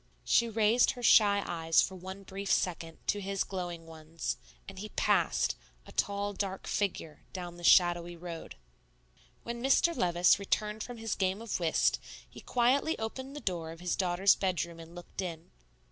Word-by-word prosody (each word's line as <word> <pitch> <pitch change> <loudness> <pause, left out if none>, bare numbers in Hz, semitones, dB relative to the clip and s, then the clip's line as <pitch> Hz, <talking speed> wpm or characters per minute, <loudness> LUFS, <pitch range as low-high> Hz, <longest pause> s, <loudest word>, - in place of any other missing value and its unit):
She 235 0 +3
raised 225 +2 +3
her 245 - -9
shy 200 -3 +6
eyes 165 -1 +1
for - - -3
one 190 +2 -8
brief 195 0 -5
second 165 -2 0
to 205 - 0
his 195 0 -1
glowing 175 -3 -5
ones; 160 0 -5 0.3
and 195 -1 -9
he 215 +2 -6
passed, - - +1 0.3
a - - -13
tall, 205 0 -1
dark 195 -1 -4
figure, 180 -6 -2
down 175 -2 -6
the 175 - -12
shadowy 175 -1 +4
road. 170 - -8 0.9
When 235 0 -5
Mr. 275 +6 +3
Levice 175 - +3
returned 210 +2 -1
from 245 +1 -6
his 225 -1 -3
game 190 +1 0
of 230 -4 -3
whist, 165 -2 +2 0.3
he - - -13
quietly 260 +6 +2
opened 260 +5 -5
the - - -5
door 170 -4 -3
of 165 - -11
his 180 0 -1
daughter's 185 +1 +3
bedroom 170 -3 -2
and 165 +1 -12
looked 175 +2 -7
in. 170 -3 -6
190 Hz, 170 wpm, -31 LUFS, 175-210 Hz, 0.9 s, shy